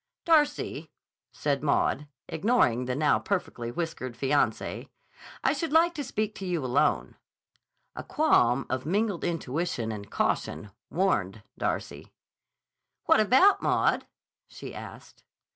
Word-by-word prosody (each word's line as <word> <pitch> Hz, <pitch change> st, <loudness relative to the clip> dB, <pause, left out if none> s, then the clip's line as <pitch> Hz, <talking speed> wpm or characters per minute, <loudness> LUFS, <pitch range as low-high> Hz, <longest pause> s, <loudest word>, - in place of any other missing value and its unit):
"Darcy," 310 Hz, -3 st, +2 dB, 0.4 s
said 140 Hz, -2 st, -1 dB
Maud, 145 Hz, 0 st, +1 dB, 0.2 s
ignoring 155 Hz, -, +2 dB
the 125 Hz, 0 st, -2 dB
now 150 Hz, +1 st, +3 dB
perfectly 150 Hz, -11 st, -3 dB
whiskered 130 Hz, -4 st, -4 dB
fiance, 140 Hz, +1 st, 0 dB, 0.5 s
"I -, -, +3 dB
should 330 Hz, -3 st, -3 dB
like 335 Hz, +2 st, +4 dB
to 300 Hz, -4 st, -4 dB
speak 215 Hz, -4 st, -2 dB
to 195 Hz, -, -5 dB
you 170 Hz, -6 st, -1 dB
alone." 125 Hz, +1 st, +1 dB, 0.8 s
A -, -, -6 dB
qualm 135 Hz, -, +2 dB
of 130 Hz, 0 st, -2 dB
mingled 200 Hz, +3 st, 0 dB
intuition 160 Hz, -6 st, -2 dB
and 100 Hz, -1 st, -7 dB
caution 105 Hz, -, -1 dB, 0.2 s
warned 105 Hz, -, 0 dB
Darcy. -, -, -4 dB, 0.9 s
"What -, -, +5 dB
about, 260 Hz, -, +5 dB
Maud?" -, -, +1 dB, 0.4 s
she -, -, -9 dB
asked. -, -, -11 dB
160 Hz, 120 wpm, -28 LUFS, -, 0.9 s, What